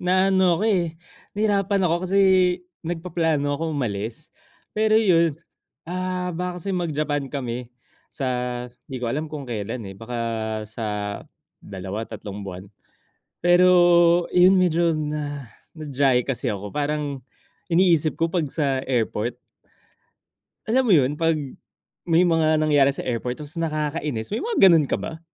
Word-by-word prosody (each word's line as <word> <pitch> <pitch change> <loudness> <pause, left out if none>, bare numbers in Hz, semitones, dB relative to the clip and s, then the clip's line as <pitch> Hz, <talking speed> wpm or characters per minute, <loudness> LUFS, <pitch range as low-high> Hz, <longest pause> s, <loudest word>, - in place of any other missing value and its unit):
na 185 +2 +2
ano 185 -2 +4
ako, 210 - -2
eh, 175 -7 +1 0.4
nahirapan 200 -2 +1
ako 175 +1 0
kasi 195 - 0 0.6
nagpaplano 165 -4 -1
ako 160 -2 -2
umalis, 115 +2 -4 0.4
pero 215 0 +3
'yun, 170 -8 +3 0.5
ah, 180 +1 -3
baka 180 +1 -4
kasi 190 +3 -4
mag 175 -2 -1
Japan 145 -2 -2
kami 125 -3 -4 0.4
sa 135 - -6 0.6
di 135 - -5
ko 125 - -5
alam 155 +4 -3
kung 150 -2 -6
kailan, 115 -1 -4
eh, 95 - -7
baka 115 +5 -7 0.5
sa 110 +2 -7 0.8
2, 100 +3 -6
tatlong, 105 -2 -7
buwan. 95 -2 -7 0.8
Pero 175 +1 +6 0.6
'yun 180 +2 +6
medyo 170 -2 +2
na 150 -2 -4 0.3
na-diyahe 135 -5 +1
kasi 135 -1 -2
ako 105 -2 -4
parang 145 -2 -2 0.5
iniisip 170 -3 +3
ko 165 0 -1
'pag 165 -5 0
sa 135 -2 0
airport 120 -3 -1 1.3
Alam 250 +4 +3
mo - - +5
'yun 135 -1 +2
'pag 165 0 +2 0.7
may 165 +2 +4
mga 160 -2 +3
nangyari 145 -3 +4
sa - - -6
airport 125 0 -2
tapos 150 +2 -7
nakakainis, 150 -6 -2
may 220 - -1
mga 450 - +5
ganun 160 -5 +4
ka - - +1
ba? 165 +1 -7
155 Hz, 140 wpm, -23 LUFS, 130-175 Hz, 1.3 s, Pero